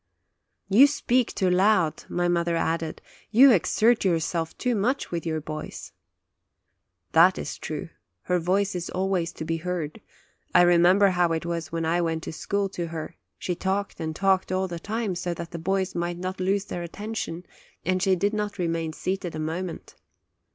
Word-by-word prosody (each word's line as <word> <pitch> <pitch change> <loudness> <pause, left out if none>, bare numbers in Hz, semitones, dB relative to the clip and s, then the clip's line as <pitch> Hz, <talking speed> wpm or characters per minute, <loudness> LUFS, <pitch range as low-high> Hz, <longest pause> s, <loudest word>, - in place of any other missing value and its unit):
"You 235 +9 +7
speak 255 -4 0
too 185 -2 +2
loud," 180 -4 +2
my 175 0 0
mother 170 -1 +1
added; 165 -1 -2 0.3
"you 255 +5 +7
exert 225 +3 +3
yourself 165 -2 0
too 250 -1 0
much 245 +7 0
with 170 -1 -3
your 160 -1 -1
boys/' 155 0 -7 1.2
That - - +6
is - - -4
true; - - -5 0.3
her 180 0 +1
voice 190 +4 +1
is 175 -2 -4
always 185 -3 -1
to 160 - -6
be 165 +1 -1
heard; 165 -3 -4 0.5
I - - +8
remember 175 +3 +5
how 175 -2 +2
it 160 +1 -2
was 170 -3 -3
when 165 0 -2
I 170 +2 +1
went 165 -1 -1
to - - -6
school 200 +5 -1
to 175 -3 -4
her; 165 0 -6 0.2
she 180 - -2
talked 190 +3 -2
and 160 -1 -3
talked 190 0 +2
all 190 0 0
the 170 -2 -6
time, 215 +2 -2
so 175 0 -3
that 170 0 -7
the 170 - -5
boys 190 +2 -1
might 175 0 -2
not 185 +1 -4
lose 195 +2 +1
their 175 - -5
attention, 180 -1 -5 0.4
and 185 0 +1
she 190 -1 +3
did 200 +4 0
not 210 -1 -2
remain 165 -3 -1
seated 185 -1 -3
a - - -4
moment. 165 +3 -4
180 Hz, 180 wpm, -26 LUFS, 165-195 Hz, 1.2 s, I